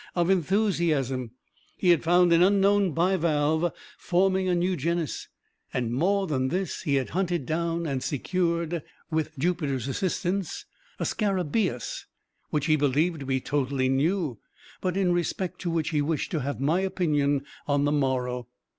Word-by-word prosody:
of 175 +1 +2
enthusiasm. 170 - +1 0.5
He 180 - +1
had 170 - +4
found 175 +1 +5
an 165 - +5
unknown 200 0 +4
bivalve, 165 -1 +1 0.3
forming 190 +1 +2
a 180 - +2
new 180 +2 +1
genus, 170 +1 -2 0.4
and, 120 -2 -1
more 195 +9 +2
than 130 -6 0
this, 185 +6 -2
he 140 - 0
had 135 -2 -1
hunted 175 -5 -1
down 170 +2 -1
and 135 -4 -2
secured, 170 +2 -1 0.3
with 155 -1 -1
Jupiter's 140 -5 -1
assistance, 185 +4 -2 0.3
a - - -2
scarabaeus 190 - -1 0.4
which 150 -2 0
he 155 -1 +4
believed 150 +4 +1
to 135 - -6
be 130 -1 +1
totally 135 -1 0
new, 145 - 0 0.4
but 185 0 -1
in 190 -2 +2
respect 180 +1 -2
to 175 - -2
which 165 -2 0
he 150 -3 +1
wished 150 +1 -1
to 160 - 0
have 140 +1 -3
my 155 +6 +2
opinion 145 -7 +1 0.2
on 145 0 +2
the 145 - +2
morrow. 125 -4 0
165 Hz, 155 wpm, -27 LUFS, 140-180 Hz, 0.5 s, found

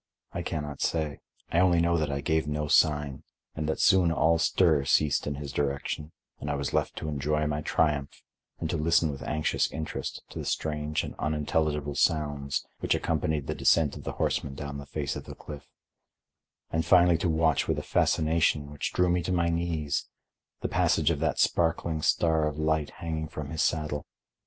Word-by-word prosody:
I 85 - -3
can 80 -3 -3
not 70 -2 -7
say; 80 -3 -1 0.3
I 85 - +3
only 90 -2 +4
know 85 0 +2
that 75 -3 0
I 70 0 -2
gave 80 +2 0
no 75 0 -2
sign, 75 -2 +2 0.3
and 75 0 -3
that 80 - -1
soon 95 -3 +5
all 80 +1 +3
stir 85 -3 +3
ceased 75 +2 +2
in 70 - -2
his 70 -1 -6
direction 70 +2 -2 0.3
and 75 - -5
I 75 - 0
was 70 -1 -3
left - - 0
to - - -5
enjoy 75 +1 0
my 75 0 -1
triumph 75 -2 0 0.4
and 80 - -2
to 85 - 0
listen 80 0 +3
with 70 - -8
anxious 75 0 0
interest 80 +1 -5
to - - -6
the - - -5
strange 75 0 -1
and - - -6
unintelligible 75 -1 0
sounds 75 -2 0
which - - +1
accompanied 80 -3 -1
the - - -2
descent 80 -4 +3
of - - -9
the - - -4
horseman 70 -1 -1
down 70 0 -6
the 70 - -9
face 70 0 -3
of - - -7
the - - -9
cliff, 75 -2 -10 1.0
and 80 0 +1
finally 90 -2 +5
to 85 - 0
watch 80 -2 +2
with - - 0
a - - -3
fascination, 80 -2 +1
which 75 - -4
drew 90 - +3
me 90 0 +2
to 85 - -3
my 85 -1 +2
knees, 85 -3 -1 0.5
the - - -1
passage 80 0 +2
of 75 - -1
that 80 0 0
sparkling 80 -1 +1
star 80 -1 +2
of 75 -1 -4
light 80 -1 0
hanging 80 -2 -4
from 75 -2 -7
his 80 - -1
saddle. 75 -2 -1
75 Hz, 195 wpm, -28 LUFS, 75-80 Hz, 1.0 s, soon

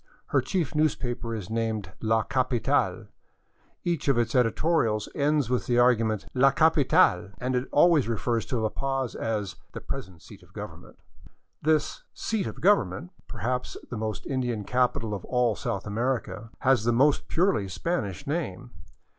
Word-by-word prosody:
Her - - +3
chief 175 -8 -2
newspaper 125 -6 -1
is 105 -1 -6
named 110 -4 -2
" - - -40
La 110 0 +4
Capital," 130 -2 0 0.8
each 170 -4 -1
of 135 -3 +3
its 120 -1 +1
editorials 120 -3 +2
ends 145 -2 +1
with 125 0 -1
the 120 - +2
argument 115 -4 +3
" - - -38
La 135 - +8
Capital! 140 - +3
" - - -24
and 125 +1 -1
it 125 +1 -1
always 155 -3 +5
refers 115 0 -1
to 125 - -1
La 110 -1 0
Paz 135 -1 -2
as 105 -4 -3
" - - -38
the - - -5
present 85 -3 -7
seat 100 +1 -13
of 90 +1 -21
Government.'* 90 -6 -9 0.6
This 155 0 +1
" - - -53 0.2
seat 220 -4 0
of - - -8
Government," 170 - +2 0.2
perhaps 125 +1 -3
the - - -3
most 110 -1 -4
Indian 125 -5 -2
capital 120 -1 0
of 100 - -5
all 125 -3 +1
South 115 -8 -3
America, 115 +1 -2
has 130 -4 +3
the 120 - +2
most 140 +5 +3
purely 170 - +1
Spanish 145 - -3
name. 135 - -3
120 Hz, 170 wpm, -27 LUFS, 110-140 Hz, 0.8 s, La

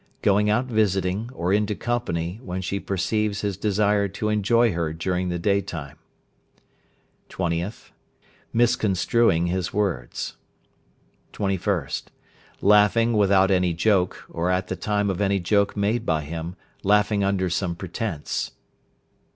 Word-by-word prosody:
Going 105 +1 +3
out 115 +5 +2
visiting, 105 -2 0
or 90 -6 -1
into 105 0 +1
company, 95 -7 -2
when 90 -3 -4
she 100 +2 -2
perceives 100 +2 -1
his 100 -2 -1
desire 105 0 +1
to 105 +3 -3
enjoy 110 +2 +3
her 85 -2 -2
during 90 +2 -1
the 85 - -1
day 100 +3 +2
time. 80 -6 -8 1.3
20th. 90 +2 -3 0.6
Mis 120 0 +3
constructing 95 -2 +2
his 90 +1 -1
words. 90 -13 -2 1.0
21st. 95 -7 -1 0.6
Laughing 105 +3 +4
without 100 -2 +4
any 90 -2 +2
joke, 90 0 +1
or 85 +2 -1
at 90 0 0
the 95 - -2
time 105 +2 0
of 95 - -3
any 100 0 +2
joke 100 +3 +1
made 105 +4 +1
by 80 -1 0
him, 80 +3 -5 0.3
laughing 105 0 +3
under 95 -1 +1
some 90 0 -1
pretence. 85 -2 -4
100 Hz, 130 wpm, -24 LUFS, 90-105 Hz, 1.3 s, Laughing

